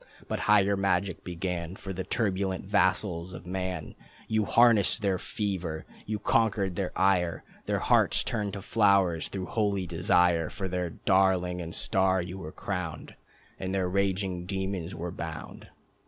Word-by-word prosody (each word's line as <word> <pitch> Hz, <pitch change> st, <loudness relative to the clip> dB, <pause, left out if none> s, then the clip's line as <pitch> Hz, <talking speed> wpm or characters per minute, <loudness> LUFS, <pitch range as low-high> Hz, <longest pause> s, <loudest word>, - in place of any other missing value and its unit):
But -, -, -2 dB
higher 100 Hz, -1 st, +5 dB
magic 95 Hz, -2 st, 0 dB
began. 90 Hz, 0 st, -4 dB
For 95 Hz, -1 st, -6 dB
the 95 Hz, +1 st, -3 dB
turbulent 95 Hz, -5 st, -1 dB
vassals 95 Hz, -3 st, +1 dB
of -, -, -10 dB
man. 90 Hz, -3 st, -4 dB, 0.3 s
You 110 Hz, -1 st, +1 dB
harnessed 115 Hz, -1 st, +4 dB
their 95 Hz, -2 st, +1 dB
fever, 90 Hz, -8 st, -3 dB, 0.2 s
you 105 Hz, 0 st, -1 dB
conquered 100 Hz, -3 st, +1 dB
their 95 Hz, 0 st, -2 dB
ire, 90 Hz, -3 st, +2 dB, 0.2 s
Their -, -, +1 dB
hearts -, -, +3 dB
turned 105 Hz, -3 st, -2 dB
to 100 Hz, -2 st, -6 dB
flowers 100 Hz, -6 st, +3 dB
through 95 Hz, -2 st, -5 dB
holy 100 Hz, -2 st, 0 dB
desire, 85 Hz, -1 st, +2 dB
For 95 Hz, -3 st, -4 dB
their 90 Hz, -1 st, -2 dB
darling 90 Hz, 0 st, +2 dB
and 85 Hz, 0 st, -6 dB
star 95 Hz, 0 st, +2 dB
you 90 Hz, +2 st, -5 dB
were 80 Hz, -4 st, -7 dB
crowned, 90 Hz, -5 st, -5 dB, 0.5 s
And 95 Hz, +1 st, -2 dB
their 95 Hz, -2 st, +1 dB
raging 95 Hz, -1 st, -1 dB
demons 95 Hz, -2 st, -3 dB
were 85 Hz, +1 st, -4 dB
bound. -, -, -7 dB
95 Hz, 150 wpm, -28 LUFS, 90-100 Hz, 0.5 s, higher